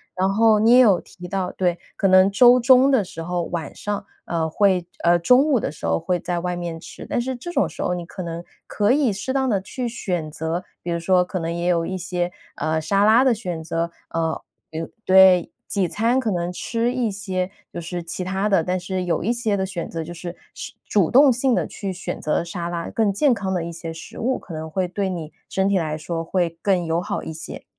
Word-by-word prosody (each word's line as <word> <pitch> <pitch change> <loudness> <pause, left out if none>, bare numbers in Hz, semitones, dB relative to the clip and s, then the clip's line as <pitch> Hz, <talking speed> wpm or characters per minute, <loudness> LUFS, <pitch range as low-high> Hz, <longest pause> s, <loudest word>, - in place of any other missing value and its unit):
然 190 +1 +1
后 220 0 +5
你 225 +2 +4
也 250 - +8
有 205 -8 +5
提 180 -1 -11
到 185 -1 -2
对， 180 -2 0 0.2
可 195 - +2
能 185 +1 +6
周 245 +4 +7
中 260 +2 +6
的 260 -7 +3
时 165 -2 -8
候， 175 +1 -2
晚 165 -4 -5
上， 205 -1 -4 0.2
呃， 165 -1 -1
会 185 -1 +2 0.2
呃， 175 0 +4
中 250 +10 +5
午 275 -6 +3
的 - - -2
时 150 - -8
候 80 0 +1
会 180 -1 0
在 175 -1 -2
外 180 +1 -2
面 170 -2 -5
吃。 - - -10
但 - - -1
是 260 +1 -3
这 260 +9 -7
种 280 -5 +2
时 - - -8
候 180 - 0
你 175 -1 -4
可 185 +1 -7
能 170 0 -5 0.2
可 210 +4 +2
以 275 -6 +2
适 210 +7 -3
当 265 -1 +1
地 200 -3 +2
去 240 +6 -4
选 180 -9 -3
择 160 +3 -3 0.2
比 175 - -6
如 170 0 -1
说 180 +1 +3
可 185 - -4
能 165 0 -2
也 170 +1 -2
有 170 -2 +2
一 185 - -3
些， 175 0 -2 0.2
呃， 160 0 -1
沙 195 +6 +1
拉 225 +5 +6
的 255 - +5
选 180 -7 -4
择。 165 +1 -2 0.2
呃， 165 -1 -1 0.3
对。 160 +1 -5 0.2
对， 185 -2 +6 0.2
几 195 -3 0
餐 230 +7 +1
可 230 -5 0
能 175 -1 -1
吃 235 +5 -1
一 240 -4 0
些， 190 -2 -3 0.2
就 170 - -5
是 175 +1 -5
其 170 +2 -5
它 190 +3 -1
的， 195 -5 +3
但 180 +2 -1
是 185 0 -3
有 175 - 0
一 230 +7 +1
些 220 -4 0
的 190 - 0
选 185 -3 -5
择， 165 - -4
就 165 +2 -7
是 175 +1 -7 0.2
吃 - - -7 0.2
主 195 -6 +2
动 270 0 +7
性 250 +1 +1
地 - - 0
去 195 -2 -5
选 185 0 -5
择 155 - 0
沙 170 0 -5
拉， 170 -1 -4
更 220 -3 +1
健 260 +6 +3
康 195 -3 -2
的 175 -2 -1
一 170 - -5
些 165 0 -6
食 165 - -10
物， 255 +3 0
可 170 - -11
能 160 0 -5
会 180 +3 -1
对 195 +1 -2
你 165 -4 -5 0.2
身 190 0 +1
体 200 - +2
来 155 -3 -1
说 165 +1 -4
会 170 -1 -1
更 185 -4 +1
友 165 +1 0
好 - - -3
一 160 - -6
些。 160 - -8
185 Hz, 260 characters per minute, -22 LUFS, 170-210 Hz, 0.3 s, 也